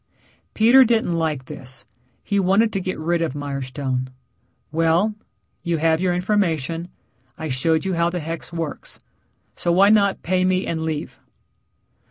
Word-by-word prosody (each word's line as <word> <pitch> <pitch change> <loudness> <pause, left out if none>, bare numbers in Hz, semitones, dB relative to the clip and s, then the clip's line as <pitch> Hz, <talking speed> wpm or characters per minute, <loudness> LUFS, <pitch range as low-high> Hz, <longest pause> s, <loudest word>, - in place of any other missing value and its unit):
Peter 240 +5 +7
didn't 225 -7 +1
like 155 -5 -1
this. 130 -2 -9 0.4
He 200 -1 0
wanted 195 +4 +3
to 195 - -1
get 185 0 -3
rid 170 +2 0
of 155 -4 -2
Mirestone. 135 -2 -3 0.6
"Well, 165 +6 +2 0.5
you 170 -2 -1
have 160 +1 +2
your 180 -1 +1
information. 175 -4 0 0.5
I 160 -2 -5
showed 160 +6 +1
you 190 - -1
how 170 0 +2
the 180 0 -3
hex 165 +1 -6
works. 165 -3 -6 0.6
So, 175 - -1
why 195 +4 +5
not 200 -2 +3
pay 185 +1 +1
me 185 0 +1
and 160 -1 -2
leave?" 160 -2 -4
170 Hz, 150 wpm, -22 LUFS, 155-185 Hz, 0.6 s, Peter